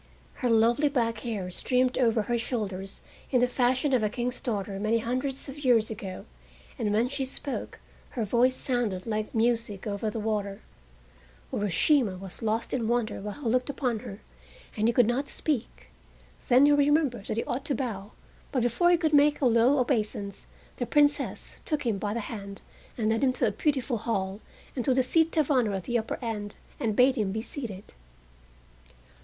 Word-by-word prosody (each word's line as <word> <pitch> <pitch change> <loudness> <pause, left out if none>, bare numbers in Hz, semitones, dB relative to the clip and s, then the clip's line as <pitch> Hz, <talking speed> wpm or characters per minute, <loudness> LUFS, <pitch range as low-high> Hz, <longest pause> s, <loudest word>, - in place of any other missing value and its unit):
Her 250 - +1
lovely 235 +6 +4
black 230 -5 0
hair 210 -6 -4
streamed 255 +6 +1
over 230 -3 +2
her 235 +2 -1
shoulders 200 -5 -4 0.3
in 255 - +3
the 250 - +4
fashion 255 +3 +1
of 250 - +4
a 215 - +1
king's 245 +3 -3
daughter 200 -4 -3
many 215 +3 +2
hundreds 255 +5 -2
of 275 +1 -8
years 230 -4 +3
ago, 195 -3 -6 0.5
and 210 -3 0
when 220 +4 +2
she 275 +1 -3
spoke 270 +1 -4 0.4
her 225 - +1
voice 245 +4 +3
sounded 235 -9 -1
like 215 -1 -3
music 225 -3 0
over 210 +1 -2
the 225 - -4
water. 210 -2 -2 0.9
Urashima 205 - +2
was 190 -1 -10
lost 225 +1 -1
in 235 -4 0
wonder 235 -3 0
while 210 +8 -7
he - - -1
looked 250 +4 +1
upon 250 -5 -1
her, 200 0 -9 0.5
and 215 +1 +1
he - - +4
could 245 - +6
not 250 +5 0
speak. 280 -7 -3 0.6
Then 255 +3 +7
he 290 - +5
remembered 290 -6 +2
that - - -2
he 230 - +1
ought 255 +3 -3
to 285 - 0
bow, 215 -6 -4 0.4
but 255 -4 +1
before 245 +9 +3
he 350 - +5
could 320 -2 0
make 295 0 +5
a 280 - +1
low 240 +4 +4
obeisance 215 -6 -1 0.3
the 245 - -2
Princess 290 0 +1
took 300 -4 -2
him 215 -4 0
by 205 +1 -2
the 235 - -1
hand 200 -2 -7 0.3
and 220 -2 +1
led 225 +4 +1
him 260 -1 +3
to 255 - 0
a 215 - +2
beautiful 260 -2 0
hall, 205 -3 -2 0.3
and 250 - -1
to 260 0 +2
the 260 - +3
seat 320 +5 +2
of 305 -1 +2
honor 235 -7 +2
at 190 - -4
the 240 +3 0
upper 220 - -4
end, 210 -3 -4 0.2
and 220 -2 0
bade 260 +3 +4
him 205 -4 0
be 220 +2 -3
seated. 225 -9 -7
235 Hz, 190 wpm, -28 LUFS, 215-260 Hz, 0.9 s, Then